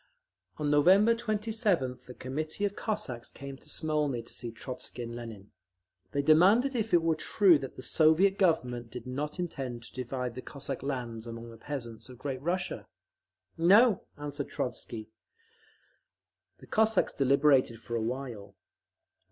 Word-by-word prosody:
On 150 -1 0
November 190 +10 +6
27th 210 - -1
a 125 - -8
committee 155 +9 -3
of 205 0 -2
Cossacks 205 - -3
came 140 0 -8
to - - -14
Smolny 150 -6 0
to - - -11
see 120 - -4
Trotzky 125 +1 -7
and 115 0 -6
Lenin. 110 -4 -9 0.6
They 140 0 0
demanded 195 - +5
if 225 -3 -1
it 175 -2 +4
were 165 -1 +3
true 170 +1 +4
that 135 - -7
the 130 - -9
Soviet 160 +8 +4
Government 125 - +1
did 120 +1 -8
not 145 +4 -4
intend 135 -9 -4
to - - -13
divide 125 -1 -3
the 130 - -6
Cossack 140 -1 -5
lands 120 -4 -4
among 115 0 -7
the 115 - -12
peasants 120 -3 -6
of 125 - -11
Great 130 -1 -4
Russia? 175 +4 -2 0.7
"No," 205 +6 +6 0.2
answered 145 -1 -5
Trotzky. 115 -3 -4 1.5
The - - -14
Cossacks 220 -2 +2
deliberated 135 -3 +3
for 120 0 -5
a 115 - 0
while. 115 -4 -5
140 Hz, 150 wpm, -30 LUFS, 120-175 Hz, 1.5 s, November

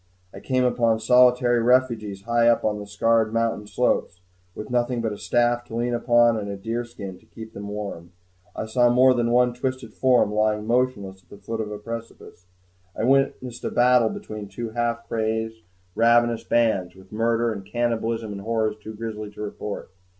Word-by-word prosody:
I - - -9
came 130 -1 0
upon 115 -3 +2
solitary 125 +1 +4
refugees 115 -5 +1
high 120 +1 +2
up 120 - +3
on 105 -1 0
the 105 - -8
scarred 110 +2 +1
mountain 115 -2 -1
slopes, 90 -3 0 0.4
with 105 - -8
nothing 120 0 0
but 110 -2 -2
a - - -8
staff 120 0 +1
to 115 - -8
lean 120 +1 -1
upon 120 -1 +3
and 100 -1 -5
a 100 - -5
deer 115 +5 -3
skin 100 -6 -9
to - - -25
keep 110 0 -11
them 100 +1 -7
warm. 100 -5 -6 0.4
I - - -3
saw 120 +2 +3
more 130 +1 +5
than 120 -1 0
one 125 0 +3
twisted 130 +1 -4
form 125 -5 +3
lying 105 0 +1
motionless 110 -6 -1
at - - -35
the 100 - -12
foot 115 +2 -4
of 105 - -5
a 105 - -5
precipice. 115 -4 -9 0.5
I - - -2
witnessed 130 -1 +1
a - - -1
battle 125 -2 +4
between 105 -2 -7
two 110 +3 -6
half 115 0 -2
crazed, 110 0 -2 0.3
ravenous 115 +1 +3
bands, 110 -7 +1
with 95 0 -17
murder, 115 +1 +1
and 100 -2 -7
cannibalism, 115 0 -2
and 100 -1 -6
horrors 110 0 -1
too 110 +1 -8
grisly 110 -1 -6
to 105 - -11
report. 105 -2 -6
115 Hz, 185 wpm, -24 LUFS, 105-120 Hz, 0.5 s, more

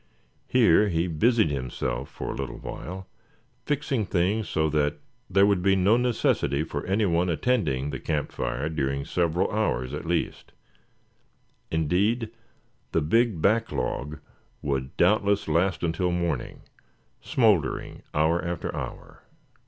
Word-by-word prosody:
Here 110 -4 +4
he 85 -1 +1
busied 100 +3 +2
himself 65 -1 -3
for - - -5
a - - -5
little 70 -2 -5
while, 95 +2 -7 0.6
fixing 140 -7 0
things 95 +2 0
so 80 0 +1
that 75 -1 +1 0.3
there 95 +1 +5
would 100 -3 +2
be 95 +1 +3
no 95 +4 +4
necessity 115 - +1
for 70 -2 -4
any 100 +3 +2
one 85 0 +1
attending 75 - 0
the 70 - -4
camp 75 -3 -2
fire 70 +5 -2
during 70 -3 -2
several 85 0 0
hours 70 - -1
at 75 - -5
least; 85 0 -2 1.2
indeed, 100 +9 +1 0.6
the 80 - +3
big 105 +2 +2
back 115 +3 +2
log 75 +3 -3 0.5
would 70 -2 -2
doubtless 100 -1 +3
last 85 +3 +1
until 85 +2 0
morning, 85 -1 -2 0.6
smouldering 105 - +1
hour 80 +3 +2
after 85 -1 -3
hour. - - -7
85 Hz, 130 wpm, -26 LUFS, 75-105 Hz, 1.2 s, there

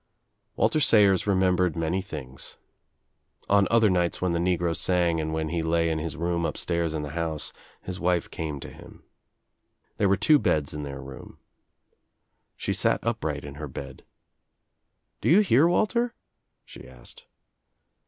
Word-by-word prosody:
Walter 155 - +2
Sayers 105 -9 +4
remembered 90 -3 +2
many 85 +3 -1
things. 70 -8 -8 0.9
On 100 -1 +4
other 110 -5 +4
ights 85 -1 0
when 90 -1 0
the 85 - 0
negro 85 -1 0
sang 85 -3 +1
and 80 0 -3
when 80 -1 -2
he 85 +1 -1
lay 85 0 +1
in 80 - -1
his 80 +1 -4
upstairs 85 -1 -1
in 75 - -3
the 75 - -6
house, 80 -1 -3 0.3
his 90 0 -6
wife 90 -1 +1
came 75 -3 -4
to - - -8
him. - - -14 1.0
here 100 - +3
were 100 - +3
two 150 +9 +5
beds 75 -10 0
in 75 - -5
their 70 -1 -6
room. 65 0 -11 1.2
She - - -2
sat - - +1
up - - -2
Ight - - -3
in 70 -1 -8
her 75 - -4
bed. 65 - -9 1.2
"Do - - +1
you 185 +7 +7
hear, 160 - +4
Walter?" 235 +6 +1 0.5
she - - -12
asked. 60 -2 -13
85 Hz, 155 wpm, -26 LUFS, 80-95 Hz, 1.2 s, you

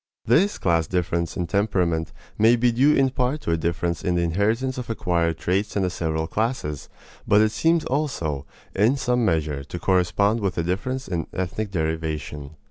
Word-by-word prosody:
This 180 - +3
class 85 -3 +1
difference 85 -2 -1
in 90 - -1
temperament 90 -4 0 0.2
may 115 +3 +5
be 120 0 +2
due 135 +6 +4
in 135 -1 +3
part 130 +4 -1
to - - -2
a - - +3
difference 85 +1 -2
in 90 - 0
the 85 - +1
inheritance 110 +10 0
of 125 - -7
acquired 85 -6 0
traits 95 +3 -1
in 100 - +1
the 90 - 0
several 80 -2 -2
classes, 105 - -2 0.4
but 105 - +5
it 110 0 +3
seems 160 +8 +2
also, 85 - -2 0.3
in 110 +8 +3
some 125 -2 +1
measure, 80 -7 0
to 85 - -6
correspond 95 +4 +2
with 95 -3 -2
a 85 - +1
difference 130 +10 -2
in 85 -3 -3
ethnic 100 +4 -3
derivation. 80 -4 -3
95 Hz, 180 wpm, -24 LUFS, 85-115 Hz, 0.4 s, may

